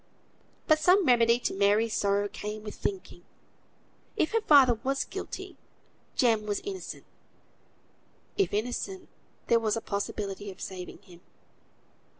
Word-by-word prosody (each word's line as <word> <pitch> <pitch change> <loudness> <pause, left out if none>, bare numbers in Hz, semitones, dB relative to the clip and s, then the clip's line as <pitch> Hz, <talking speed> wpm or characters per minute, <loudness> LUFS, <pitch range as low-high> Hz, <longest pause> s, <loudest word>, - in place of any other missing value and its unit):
But 310 -1 +4
some 365 +4 +4
remedy 235 -2 +5
to - - -1
Mary's 205 +3 +2
sorrow 200 0 +1
came 210 +1 -6
with 210 - -6
thinking. 390 -2 -5 0.9
If 310 - +1
her 455 - +2
father 265 - +6
was 270 +1 0
guilty, 390 +1 -7 0.6
Jem 225 -4 +2
was 205 -1 -1
innocent. 390 -2 -7 1.3
If 395 - +1
innocent, 245 - -3 0.4
there 235 - +4
was 220 -1 0
a - - 0
possibility 200 -1 -4
of 190 - -11
saving 185 +1 -8
him. 175 -3 -16
225 Hz, 130 wpm, -28 LUFS, 205-295 Hz, 1.3 s, father